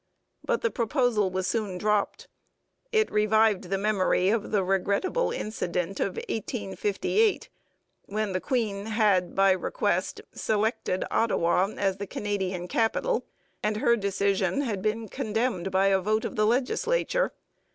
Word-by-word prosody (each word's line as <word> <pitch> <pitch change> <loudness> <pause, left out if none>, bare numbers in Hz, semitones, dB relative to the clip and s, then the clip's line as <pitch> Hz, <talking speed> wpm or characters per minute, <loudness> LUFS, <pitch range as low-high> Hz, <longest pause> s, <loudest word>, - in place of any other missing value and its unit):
But 485 -2 0
the 470 - 0
proposal 235 -4 +1
was 185 0 -2
soon 205 -3 -1
dropped. 210 +1 0 0.6
It 440 -1 +2
revived 215 -1 +3
the 195 +2 -1
memory 195 -2 +2
of 215 0 0
the 205 -3 +1
regrettable 200 - 0
incident 180 -3 -3
of 190 - -1
1858 205 - -1 0.6
when 210 0 -2
the 185 - -1
Queen 220 -6 -1
had, 210 -5 +2
by 195 0 +5
request, 190 - -1
selected 215 -3 -1
Ottawa 190 -4 +2
as 195 -1 0
the 200 0 -5
Canadian 190 -4 -3
capital 235 - 0 0.3
and 210 0 0
her 235 +1 +3
decision 200 +1 0
had 215 -8 -2
been 220 +2 -1
condemned 215 -3 -1
by 190 +1 +2
a 195 -1 +3
vote 215 +3 0
of - - -4
the 215 0 +2
legislature. 455 - +1
210 Hz, 135 wpm, -27 LUFS, 190-225 Hz, 0.6 s, by